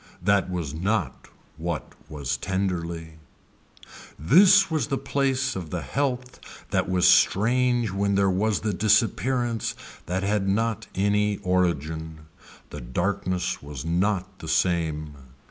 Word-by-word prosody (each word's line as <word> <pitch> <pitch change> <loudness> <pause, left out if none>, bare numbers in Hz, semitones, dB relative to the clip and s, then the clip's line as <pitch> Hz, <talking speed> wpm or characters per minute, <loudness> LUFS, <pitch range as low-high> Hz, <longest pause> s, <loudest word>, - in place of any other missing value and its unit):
That 100 -2 +2
was 85 -6 -3
not 95 +2 -2 0.3
what 80 -4 -4 0.2
was 70 -2 -3
tenderly. 85 -3 -3 1.0
This 185 - +5
was 155 -2 0
the 140 -2 -1
piece 135 -2 0
of 85 -4 -5
the 90 +1 -4
health 130 -2 -2 0.3
that - - 0
was 90 -1 +3
strange 120 +3 +3
when 100 +1 0
there 100 0 +3
was 105 +3 0
the 105 -1 -1
disappearance 115 +3 +1 0.3
that 90 +3 -2
had 100 -1 0
not 110 +2 -1
any 105 +1 +1
origin. 80 -3 -1 0.5
The - - -7
darkness 90 +7 -2
was 70 -1 -8
not 95 +2 -1
the 80 - -8
same. 80 -3 0
95 Hz, 125 wpm, -25 LUFS, 85-110 Hz, 1.0 s, This